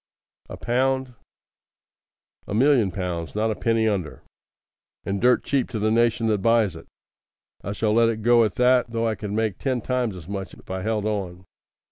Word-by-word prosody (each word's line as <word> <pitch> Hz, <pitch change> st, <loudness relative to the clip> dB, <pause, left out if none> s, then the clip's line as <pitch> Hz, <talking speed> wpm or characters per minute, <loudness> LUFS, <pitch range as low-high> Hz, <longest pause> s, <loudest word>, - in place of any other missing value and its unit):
"A -, -, -7 dB
pound?" 130 Hz, +1 st, 0 dB, 1.3 s
"A 100 Hz, -, -3 dB
million 125 Hz, -4 st, +4 dB
pounds. 90 Hz, -3 st, -4 dB
Not 110 Hz, +1 st, +1 dB
a -, -, -2 dB
penny 115 Hz, 0 st, +1 dB
under. 95 Hz, -8 st, -3 dB, 0.8 s
And 100 Hz, 0 st, -2 dB
dirt 125 Hz, +1 st, +4 dB
cheap 135 Hz, -3 st, 0 dB
to 115 Hz, -, -4 dB
the 110 Hz, +1 st, +1 dB
nation 115 Hz, 0 st, +2 dB
that 110 Hz, -2 st, +1 dB
buys 115 Hz, -2 st, +2 dB
it. -, -, -12 dB, 0.8 s
I 100 Hz, -, -4 dB
shall 105 Hz, +1 st, 0 dB
let 115 Hz, 0 st, +4 dB
it 110 Hz, -1 st, -3 dB
go 120 Hz, 0 st, +5 dB
at 105 Hz, -4 st, -1 dB
that, 125 Hz, -1 st, +3 dB
though 115 Hz, 0 st, -1 dB
I 110 Hz, -, 0 dB
could 105 Hz, 0 st, -6 dB
make 110 Hz, -2 st, -1 dB
ten 130 Hz, -3 st, -1 dB
times 125 Hz, -3 st, -2 dB
as 85 Hz, -3 st, -11 dB
much 100 Hz, -1 st, -6 dB
if -, -, -13 dB
I 95 Hz, 0 st, -3 dB
held 105 Hz, 0 st, -1 dB
on. 95 Hz, -4 st, -3 dB
110 Hz, 185 wpm, -24 LUFS, 100-120 Hz, 1.3 s, go